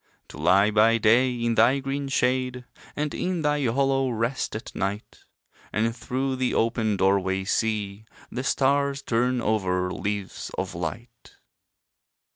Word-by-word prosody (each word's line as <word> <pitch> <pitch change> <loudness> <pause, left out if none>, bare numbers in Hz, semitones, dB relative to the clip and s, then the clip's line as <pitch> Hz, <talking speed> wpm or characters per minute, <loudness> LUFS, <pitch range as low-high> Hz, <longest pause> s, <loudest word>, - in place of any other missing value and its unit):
To 75 - -11
lie 95 +6 +4
by 110 +2 +4
day 120 +4 +4
in 120 -1 -1
thy 125 +4 +4
green 135 +1 -3
shade, 125 -1 0 0.3
And 150 0 -2
in 180 -3 -2
thy 150 -1 +1
hollow 135 +2 +1
rest 115 +2 -2
at 110 - -7
night; 100 +2 -4 0.5
And 115 +2 0
through 130 +1 -2
the 130 -1 0
open 110 -2 +1
doorway 95 0 +1
see 105 0 -1 0.3
The 125 - -4
stars 140 +1 +1
turn 125 +2 +1
over 90 -4 0
leaves 100 -1 -4
of 95 -1 -3
light. 105 +8 -7
115 Hz, 135 wpm, -25 LUFS, 100-130 Hz, 0.5 s, lie